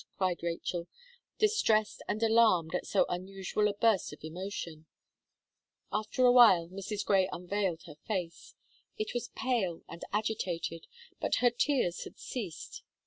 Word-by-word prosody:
cried 185 -2 0
Rachel, 170 0 -3 0.5
distressed 315 - +2
and 215 +2 -1
alarmed 220 -8 +4
at 180 - -2
so 200 - +3
unusual 190 +3 -1
a 205 - -2
burst 215 -3 +2
of 150 - -12
emotion. 165 -1 -6 1.0
After 215 +4 +1
a 245 - +7
while, 205 -9 +7
Mrs. 200 +2 -4
Gray 190 -2 +3
unveiled 180 -1 -2
her 150 -3 -11
face. 190 - -4 0.4
It 430 -1 -3
was 240 - -3
pale 230 -11 -1
and 170 - -10
agitated; 185 -6 -2 0.3
but - - +1
her 245 -1 +4
tears 240 - +1
had - - -11
ceased. 205 -11 -6
195 Hz, 140 wpm, -31 LUFS, 175-225 Hz, 1.0 s, a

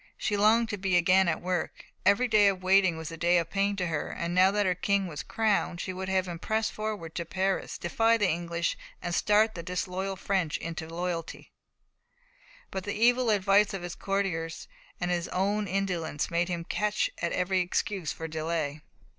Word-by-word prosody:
She 210 - -1
longed 220 +3 +4
to 205 - -4
be 185 -2 +2
again 185 +2 +4
at 165 0 -1
work. 180 -2 -3 0.2
Every 220 +5 +4
day 215 -3 +5
of 190 -2 0
waiting 185 -2 +4
was 160 0 -6
a 165 - -7
day 175 +2 +3
of 165 -1 -1
pain 200 0 +1
to 185 -2 -1
her. 160 -4 -3
Now 180 +2 +4
that 205 +1 +1
her 185 - +2
King 195 +2 0
was 150 -5 -5
crowned, 210 -5 0
she 185 - -4
would 190 +1 -5
have 190 -1 +1
him 170 -2 -5
press 220 +3 0
forward 210 -7 -5
to 170 - -3
Paris, 190 +3 -1
defy 225 +6 +2
the 205 -3 +2
English, 170 0 -1 0.2
and 175 - -4
startle 210 +4 +3
the 170 - -6
disloyal 185 +2 -3
French 185 -5 -1
into 165 -1 -5
loyalty; 170 -1 -4 1.2
but 190 - -4
the 205 - -3
evil 245 +2 +3
advice 200 0 +3
of 185 - -6
his 175 -1 -5
courtiers 180 -5 -2 0.3
and 180 0 -1
his 175 -1 -1
own 205 +3 0
indolence 180 -6 -2
made 170 +1 +1
him 175 -2 -3
catch 210 +4 0
at 170 - 0
every 185 +1 +1
excuse 180 0 -1
for 160 - -6
delay. 155 -2 -3
185 Hz, 190 wpm, -28 LUFS, 170-200 Hz, 1.2 s, day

